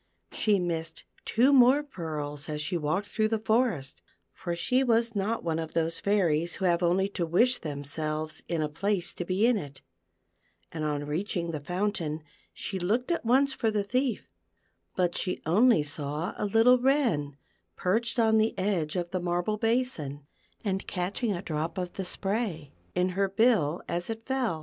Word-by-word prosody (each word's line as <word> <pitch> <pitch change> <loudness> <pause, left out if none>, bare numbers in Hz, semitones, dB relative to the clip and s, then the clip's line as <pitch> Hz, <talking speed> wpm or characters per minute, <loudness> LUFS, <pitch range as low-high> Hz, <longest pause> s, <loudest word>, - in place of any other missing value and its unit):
She 210 -2 +2
missed 165 -3 -3 0.2
two 255 +5 +4
more 265 +2 +6
pearls 155 - -5
as 150 -1 -3
she 155 +4 -1
walked 170 +5 -1
through 215 +1 +1
the 225 0 0
forest, 220 - 0 0.3
for 175 -1 -4
she 250 +10 +2
was 230 -2 +2
not 205 +3 -1
one 165 -1 -1
of 160 -1 -5
those 165 0 0
fairies 175 -5 +1
who 190 - -2
have 175 -1 +3
only 180 +3 +2
to 190 -3 -2
wish 235 +10 +3
themselves 155 +1 -4
in 165 -2 0
a - - 0
place 190 +4 -1
to^e 185 +3 -1
in 240 0 +4
it; 140 -6 -8 0.9
and 160 -2 -4
on 145 -1 -1
reaching 170 +2 -2
the 155 - -3
fountain, 170 -2 -2 0.3
she 190 - -4
looked 225 - 0
at 340 - 0
once 265 +4 +3
for 225 - 0
the 210 -2 0
thief; 250 +3 -1 0.7
but 175 -2 +1
she 180 - -2
only 210 +2 +4
saw 150 +2 -3
a - - -2
little 225 +4 +5
wren, 240 - +1 0.4
perched 230 +6 0
on 220 -1 +4
the 220 +1 +1
edge 185 -5 0
of 175 -1 -2
the 185 - -1
marble 175 +4 -1
basin, 220 - -1 0.4
and 195 -3 -2
catching 200 +5 -2
a 180 -1 -3
drop 160 +3 -3
of 180 -1 -3
the 190 - -4
spray 195 - -2 0.2
in 180 +1 +2
her 195 +1 0
bill 195 -7 +2
as 175 +3 -2
it 225 0 -5
fell. 255 -11 -1
185 Hz, 175 wpm, -28 LUFS, 160-225 Hz, 0.9 s, more